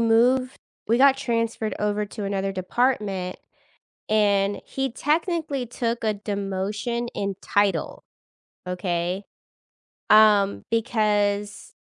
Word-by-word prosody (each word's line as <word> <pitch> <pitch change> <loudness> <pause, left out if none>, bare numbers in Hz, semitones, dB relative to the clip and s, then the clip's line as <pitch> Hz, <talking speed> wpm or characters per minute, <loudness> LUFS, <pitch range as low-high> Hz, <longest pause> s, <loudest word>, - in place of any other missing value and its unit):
moved 245 +3 +3 0.3
we 230 +2 +3
got 270 0 +6
transferred 230 -4 -1
over 210 0 0
to 210 0 -7
another 195 0 -1
department, 195 -2 -1 0.7
and 205 -2 +2
he 270 0 -3
technically 300 0 -1
took 235 0 -3
a 215 -1 +1
demotion 205 +3 -3
in 200 -1 -2
title, 200 -5 0 0.6
okay? 180 +1 -2 0.9
Um, 210 -2 +5
because 210 -3 0
210 Hz, 95 wpm, -24 LUFS, 200-240 Hz, 0.9 s, got